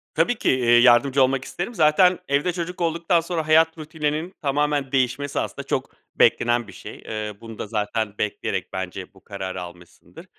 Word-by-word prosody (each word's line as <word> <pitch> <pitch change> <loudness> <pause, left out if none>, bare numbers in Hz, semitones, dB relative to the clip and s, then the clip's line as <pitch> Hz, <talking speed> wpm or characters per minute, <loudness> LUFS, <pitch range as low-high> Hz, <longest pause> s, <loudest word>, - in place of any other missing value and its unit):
Tabii 165 +10 +2
ki, - - 0
eee, 120 -2 +4
yardımcı 130 +3 +5
olmak 130 0 0
isterim. 175 +7 -5
Zaten 175 +3 +4
evde 145 +6 +1
çocuk 180 +1 -5
olduktan 170 +1 +1
sonra 165 -2 -3
hayat 160 +1 +4
rutininin 155 +2 -3
tamamen 145 -1 0
değişmesi 135 +2 0
aslında - - -4
çok - - -2 0.2
beklenen 120 -1 +3
bir - - -12
şey. - - -10
Eee, 110 -1 -4
bunu 115 -2 -10
da - - -4
zaten 105 0 -2
bekleyerek 105 - -3
bence 95 0 -6
bu 95 - -21
kararı 95 -2 -6
almışsındır. 85 -1 -13
140 Hz, 170 wpm, -23 LUFS, 110-160 Hz, 0.2 s, yardımcı